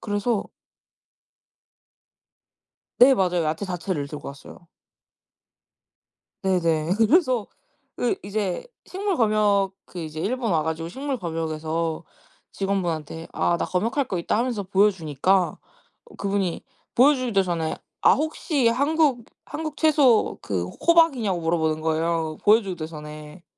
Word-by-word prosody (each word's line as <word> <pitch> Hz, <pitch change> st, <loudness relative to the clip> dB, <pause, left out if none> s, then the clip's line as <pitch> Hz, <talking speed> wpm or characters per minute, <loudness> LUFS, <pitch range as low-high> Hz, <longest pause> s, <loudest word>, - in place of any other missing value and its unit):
그래서 205 Hz, +1 st, -1 dB, 2.6 s
네. 265 Hz, +2 st, +9 dB
맞아요. 180 Hz, -6 st, +1 dB
야채 155 Hz, +4 st, -2 dB
자체를 175 Hz, -5 st, -3 dB
들고 150 Hz, -1 st, -7 dB
왔어요. 140 Hz, 0 st, -11 dB, 1.8 s
네네. 170 Hz, -4 st, +1 dB
그래서 250 Hz, -, +3 dB, 0.5 s
그 245 Hz, -, +1 dB
이제 200 Hz, -2 st, -2 dB, 0.2 s
식물 390 Hz, 0 st, -2 dB
검역 210 Hz, -3 st, +2 dB
그 180 Hz, -, -9 dB
이제 155 Hz, -1 st, -5 dB
일본 230 Hz, +3 st, -1 dB
와 160 Hz, -2 st, +2 dB
가지고 160 Hz, +1 st, -3 dB
식물 270 Hz, +8 st, -4 dB
검역에서 160 Hz, -1 st, -3 dB, 0.5 s
직원분한테 170 Hz, -5 st, -3 dB
"아. 170 Hz, -, +1 dB
나 -, -, -1 dB
검역할 230 Hz, +10 st, 0 dB
거 185 Hz, -, -2 dB
있다." 170 Hz, -, 0 dB
하면서 235 Hz, -3 st, -1 dB
보여주니까 190 Hz, -2 st, +2 dB, 0.6 s
그분이 195 Hz, -3 st, -1 dB, 0.3 s
보여주기도 255 Hz, -6 st, +4 dB
전에 170 Hz, -3 st, -2 dB, 0.3 s
아. -, -, +6 dB
혹시 300 Hz, -4 st, 0 dB
한국, 280 Hz, -1 st, +1 dB, 0.2 s
한국 310 Hz, -1 st, -5 dB
채소 290 Hz, -8 st, +3 dB
그 90 Hz, -4 st, -2 dB
호박이냐고 265 Hz, -, +2 dB
물어보는 160 Hz, -1 st, 0 dB
거예요, 160 Hz, 0 st, -1 dB
보여주기도 200 Hz, -6 st, +3 dB
전에. 150 Hz, +1 st, -10 dB
190 Hz, 265 characters per minute, -24 LUFS, 165-235 Hz, 2.6 s, 네